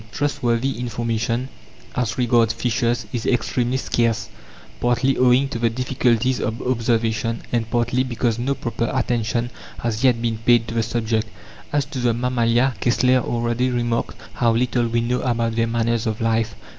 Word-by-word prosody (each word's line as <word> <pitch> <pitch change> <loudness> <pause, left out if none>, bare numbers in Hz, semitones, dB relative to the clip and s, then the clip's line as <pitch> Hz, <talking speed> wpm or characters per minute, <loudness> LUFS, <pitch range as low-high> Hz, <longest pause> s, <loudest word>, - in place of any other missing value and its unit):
Trustworthy 135 -3 0
information 120 +1 -2 0.5
as 115 -6 -1
regards 120 -2 +3
fishes 120 0 0
is 115 -2 -2
extremely 125 0 +1
scarce, 115 -3 0 0.5
partly 125 +2 +2
owing 130 +2 +4
to 120 - -4
the 115 0 +2
difficulties 125 0 +1
of 110 +1 -2
observation, 115 -2 0
and 115 -2 0
partly 120 +2 +1
because 120 -2 -1
no 135 +3 0
proper 115 -2 -2
attention 120 -1 0 0.3
has 115 0 -2
yet 125 -3 +4
been 115 -2 -1
paid 115 0 +3
to - - -5
the 115 - +1
subject. 110 -1 -1 0.4
As 145 -2 +1
to 145 -2 -6
the 120 -2 +1
mammalia, 120 +1 +2
Kessler 125 +2 +3
already 120 +1 0
remarked 120 -1 -1 0.2
how 115 -2 +2
little 120 0 +1
we 115 0 0
know 125 +2 0
about 115 -2 0
their 115 0 +1
manners 115 0 0
of 110 -1 -2
life. 115 -2 0
120 Hz, 155 wpm, -22 LUFS, 115-125 Hz, 0.5 s, owing